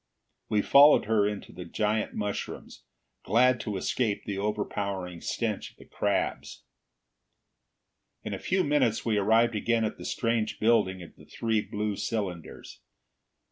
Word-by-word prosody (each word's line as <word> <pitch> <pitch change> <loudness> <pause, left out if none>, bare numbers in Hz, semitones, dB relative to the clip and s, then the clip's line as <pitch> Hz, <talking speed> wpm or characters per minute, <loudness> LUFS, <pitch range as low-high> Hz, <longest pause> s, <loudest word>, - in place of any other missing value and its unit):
We 105 -2 +2
followed 145 +2 +7
her 105 -1 +2
into 105 -1 -5
the 90 - -8
giant 105 +4 -1
mushrooms, 105 -1 -5 0.4
glad 125 +2 +3
to 105 -2 -3
escape 105 +1 -1
the 100 -2 -3
overpowering 100 -4 -3
stench - - -3
of - - -26
the - - -15
crabs. - - -2 1.6
In - - -4
a - - -4
few 185 0 0
minutes 140 -6 +1
we 110 -3 +2
arrived 115 +4 +3
again 115 +1 +1
at 110 - -5
the - - -8
strange 115 -2 -1
building 95 -5 +2
of 85 - -14
the - - -16
three 110 -2 -1
blue 105 0 -3
cylinders. 95 -7 -5
105 Hz, 140 wpm, -28 LUFS, 100-115 Hz, 1.6 s, followed